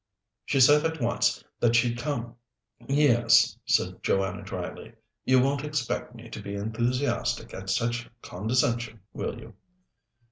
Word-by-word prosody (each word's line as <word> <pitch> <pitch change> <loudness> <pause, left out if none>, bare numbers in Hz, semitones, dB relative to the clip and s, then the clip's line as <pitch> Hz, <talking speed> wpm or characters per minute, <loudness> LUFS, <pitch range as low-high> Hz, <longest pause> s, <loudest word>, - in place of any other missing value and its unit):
She 135 - +1
said 145 +4 +6
at 160 -1 -1
once 120 -1 +1 0.2
that 120 -1 +3
she'd 120 0 +2
come." 120 -4 -3 0.5
"Yes," 120 -5 +4
said - - +1
Joanna 95 -1 0
dryly. - - -7 0.3
"You 130 0 +5
won't 135 +2 +1
expect 145 -4 -3
me 115 0 -11
to 105 - -6
be 100 0 -6
enthusiastic 120 +6 -1
at 95 0 -7
such 120 +4 -1
condescension, 115 +2 -1
will - - -4
you?" - - -12
120 Hz, 135 wpm, -27 LUFS, 115-135 Hz, 0.5 s, said